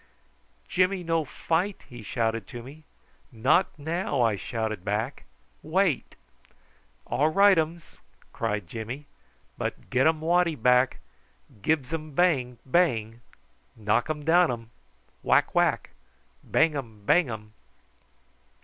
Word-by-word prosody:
"Jimmy 185 Hz, 0 st, +1 dB
no 165 Hz, -1 st, +1 dB
fight?" 175 Hz, +8 st, -2 dB
he 120 Hz, -2 st, -10 dB
shouted 115 Hz, -1 st, -2 dB
to 120 Hz, -2 st, -8 dB
me. 150 Hz, +5 st, -13 dB, 0.5 s
"Not 125 Hz, +12 st, +2 dB
now," 160 Hz, 0 st, -2 dB
I 115 Hz, -3 st, +2 dB
shouted 110 Hz, -1 st, -4 dB
back. 105 Hz, +3 st, -3 dB, 0.4 s
"Wait." 170 Hz, -2 st, 0 dB, 0.9 s
"All 150 Hz, +3 st, +1 dB
rightums," 170 Hz, -3 st, +2 dB, 0.3 s
cried 105 Hz, -4 st, -2 dB
Jimmy: 115 Hz, -, -6 dB, 0.5 s
"but -, -, -5 dB
gettum 155 Hz, +5 st, +3 dB
waddy 170 Hz, +1 st, +2 dB
back, 125 Hz, +1 st, +3 dB, 0.6 s
gibs 150 Hz, +3 st, 0 dB
um 155 Hz, -2 st, -4 dB
bang, 135 Hz, -8 st, +2 dB
bang 120 Hz, -7 st, +1 dB, 0.6 s
knockum 120 Hz, +8 st, 0 dB
downum 160 Hz, -9 st, +3 dB, 0.5 s
whack, -, -, +3 dB
whack -, -, +1 dB, 0.5 s
bangum, 135 Hz, -10 st, 0 dB
bangum!" 110 Hz, -11 st, +1 dB
140 Hz, 100 wpm, -27 LUFS, 115-165 Hz, 0.9 s, gettum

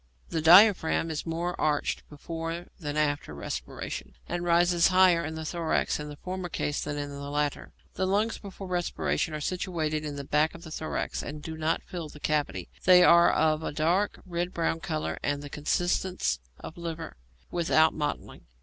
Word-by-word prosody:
The 160 Hz, -, -1 dB
diaphragm 170 Hz, -1 st, +6 dB
is 155 Hz, +1 st, -4 dB
more 170 Hz, +2 st, -2 dB
arched 150 Hz, -1 st, +1 dB
before 165 Hz, +3 st, -5 dB
than 150 Hz, -3 st, -4 dB
after 145 Hz, -, 0 dB
respiration, 60 Hz, -3 st, -6 dB
and 175 Hz, 0 st, -3 dB
rises 175 Hz, 0 st, +4 dB
higher 185 Hz, -2 st, +5 dB
in 160 Hz, 0 st, -4 dB
the 160 Hz, 0 st, -5 dB
thorax 165 Hz, -1 st, 0 dB
in 150 Hz, 0 st, -6 dB
the 145 Hz, -, -8 dB
former 185 Hz, +3 st, -5 dB
case 145 Hz, -3 st, -2 dB
than 145 Hz, 0 st, -3 dB
in 145 Hz, 0 st, -4 dB
the 140 Hz, 0 st, -6 dB
latter. 145 Hz, 0 st, -2 dB, 0.2 s
The 190 Hz, -, -1 dB
lungs 210 Hz, +4 st, +1 dB
before 195 Hz, -1 st, -9 dB
respiration 175 Hz, -3 st, -1 dB
are -, -, -3 dB
situated 160 Hz, -2 st, -2 dB
in 150 Hz, -1 st, -4 dB
the 140 Hz, -, -5 dB
back 150 Hz, +4 st, +1 dB
of 170 Hz, -, -11 dB
the 160 Hz, -, -9 dB
thorax, 155 Hz, 0 st, -3 dB
and 150 Hz, +1 st, -6 dB
do 160 Hz, -, -5 dB
not 160 Hz, +1 st, 0 dB
fill 170 Hz, -4 st, -6 dB
that 150 Hz, -, -14 dB
cavity; 145 Hz, -, -1 dB, 0.2 s
they 180 Hz, -1 st, +7 dB
are 170 Hz, -1 st, +7 dB
of 155 Hz, 0 st, +2 dB
a -, -, -3 dB
dark, 170 Hz, +7 st, +1 dB
red 175 Hz, 0 st, -3 dB
brown 165 Hz, -1 st, 0 dB
colour 160 Hz, -3 st, -3 dB
and 145 Hz, -, 0 dB
of 140 Hz, -, -8 dB
the 145 Hz, -, -8 dB
consistence 175 Hz, -, 0 dB, 0.2 s
of 165 Hz, -, -9 dB
liver, 165 Hz, -, -5 dB, 0.4 s
without 160 Hz, -2 st, +3 dB
mottling. 150 Hz, -, -4 dB
160 Hz, 185 wpm, -28 LUFS, 150-175 Hz, 0.4 s, they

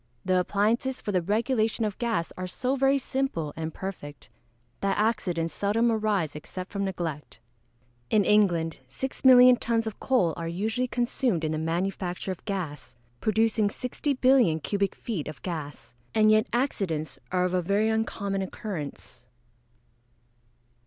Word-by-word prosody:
The 185 Hz, -1 st, +3 dB
appliances 225 Hz, +8 st, 0 dB
for 205 Hz, -, -3 dB
the 185 Hz, -2 st, +2 dB
regulation 220 Hz, +3 st, +1 dB
of 210 Hz, -1 st, -4 dB
gas 230 Hz, -8 st, -1 dB
are 185 Hz, 0 st, -4 dB
so 255 Hz, +8 st, -1 dB
very 270 Hz, +1 st, +3 dB
simple 260 Hz, -, -2 dB
and 160 Hz, 0 st, -4 dB
perfect, 150 Hz, -7 st, -8 dB, 0.5 s
that 195 Hz, 0 st, 0 dB
accidents 185 Hz, -7 st, 0 dB
seldom 225 Hz, +4 st, +1 dB
arise 210 Hz, -9 st, 0 dB
except 180 Hz, +5 st, -7 dB
from 200 Hz, -1 st, -2 dB
neglect. 170 Hz, -6 st, -4 dB, 0.7 s
In 210 Hz, -3 st, +3 dB
England 175 Hz, -6 st, +3 dB
6,000,000 255 Hz, -, +5 dB
tons 230 Hz, -1 st, 0 dB
of 220 Hz, -2 st, -5 dB
coal 190 Hz, -11 st, +2 dB
are 165 Hz, -1 st, -4 dB
usually 220 Hz, +9 st, -1 dB
consumed 240 Hz, -7 st, 0 dB
in 155 Hz, -, 0 dB
the 155 Hz, -, -1 dB
manufacture 180 Hz, +3 st, -2 dB
of 185 Hz, -, -7 dB
gas, 175 Hz, -, -5 dB, 0.2 s
producing 220 Hz, -, +2 dB
60,000,000,000 255 Hz, -, +2 dB
cubic 200 Hz, -1 st, 0 dB
feet 200 Hz, -11 st, -4 dB
of 155 Hz, -2 st, -7 dB
gas. 155 Hz, -8 st, -6 dB, 0.2 s
And 215 Hz, -1 st, +5 dB
yet 215 Hz, +3 st, +4 dB
accidents 165 Hz, -, -1 dB
are 180 Hz, -1 st, +2 dB
of 180 Hz, 0 st, 0 dB
very 200 Hz, +5 st, +2 dB
uncommon 200 Hz, -3 st, -1 dB
occurrence. 150 Hz, -, -6 dB
200 Hz, 140 wpm, -27 LUFS, 170-225 Hz, 0.7 s, 6,000,000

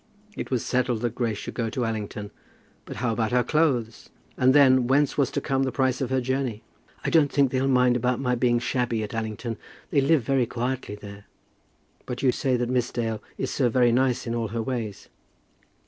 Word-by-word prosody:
It -, -, -5 dB
was 125 Hz, -3 st, -1 dB
settled 125 Hz, -3 st, 0 dB
that 120 Hz, -2 st, -1 dB
Grace 115 Hz, -3 st, -1 dB
should -, -, -6 dB
go 115 Hz, -2 st, -2 dB
to 120 Hz, +2 st, -2 dB
Allington; 105 Hz, -2 st, -4 dB, 0.5 s
but -, -, -8 dB
how 115 Hz, +1 st, -1 dB
about 110 Hz, 0 st, -1 dB
her 125 Hz, 0 st, +3 dB
clothes? 125 Hz, -6 st, 0 dB, 0.3 s
And 130 Hz, 0 st, +4 dB
then, 130 Hz, -3 st, +6 dB
whence 140 Hz, +2 st, +2 dB
was 140 Hz, -, +2 dB
to 140 Hz, -, -2 dB
come 135 Hz, 0 st, 0 dB
the 135 Hz, -1 st, 0 dB
price 130 Hz, -1 st, 0 dB
of 130 Hz, -, -1 dB
her 130 Hz, 0 st, +1 dB
journey? 130 Hz, -3 st, -2 dB, 0.4 s
"I -, -, 0 dB
don't 155 Hz, -4 st, +4 dB
think 140 Hz, -3 st, +3 dB
they'll 130 Hz, +1 st, +1 dB
mind 125 Hz, -2 st, +4 dB
about 125 Hz, 0 st, 0 dB
my 125 Hz, -2 st, 0 dB
being 120 Hz, 0 st, +2 dB
shabby 120 Hz, -2 st, -1 dB
at 105 Hz, -, -6 dB
Allington. 115 Hz, +1 st, -4 dB, 0.3 s
They 140 Hz, -, +3 dB
live 140 Hz, -1 st, +3 dB
very 130 Hz, 0 st, +1 dB
quietly 125 Hz, -2 st, -3 dB
there." 100 Hz, -1 st, -11 dB, 0.8 s
"But 125 Hz, +1 st, -5 dB
you 130 Hz, -, +5 dB
say 130 Hz, 0 st, 0 dB
that 120 Hz, 0 st, -1 dB
Miss 125 Hz, -1 st, 0 dB
Dale 115 Hz, -2 st, -2 dB, 0.2 s
is -, -, -2 dB
so 130 Hz, -4 st, +1 dB
very 120 Hz, 0 st, +3 dB
nice 125 Hz, 0 st, +1 dB
in 115 Hz, -, -2 dB
all 115 Hz, -1 st, -1 dB
her 115 Hz, +2 st, -3 dB
ways." 115 Hz, -5 st, -4 dB
125 Hz, 210 wpm, -25 LUFS, 115-130 Hz, 0.8 s, then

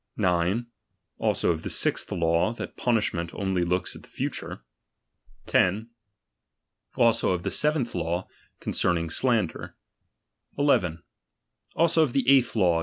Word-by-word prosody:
9. 90 Hz, +6 st, +1 dB, 0.5 s
Also -, -, +1 dB
of 80 Hz, -1 st, -3 dB
the -, -, -5 dB
sixth -, -, 0 dB
law, 85 Hz, +5 st, +1 dB
that -, -, -7 dB
punish 115 Hz, -4 st, +1 dB
ment 85 Hz, -1 st, -4 dB
only 95 Hz, -3 st, 0 dB
looks 90 Hz, +1 st, -1 dB
at -, -, -11 dB
the -, -, -19 dB
future. -, -, -5 dB, 0.8 s
10. 105 Hz, +6 st, +1 dB, 1.0 s
Also 115 Hz, -4 st, +3 dB
of 90 Hz, -1 st, -3 dB
the 100 Hz, -, -2 dB
seventh 150 Hz, -, +1 dB
law, 85 Hz, +1 st, -2 dB, 0.3 s
concerning 85 Hz, -2 st, 0 dB
slander. 115 Hz, -4 st, 0 dB, 0.8 s
1 140 Hz, -, 0 dB, 0.2 s
1. 85 Hz, -2 st, -6 dB, 0.7 s
Also 165 Hz, 0 st, +3 dB
of 145 Hz, -6 st, +1 dB
the 135 Hz, -, 0 dB
eighth 130 Hz, -3 st, +4 dB
law. 90 Hz, -6 st, +3 dB
95 Hz, 135 wpm, -26 LUFS, 85-120 Hz, 1.0 s, eighth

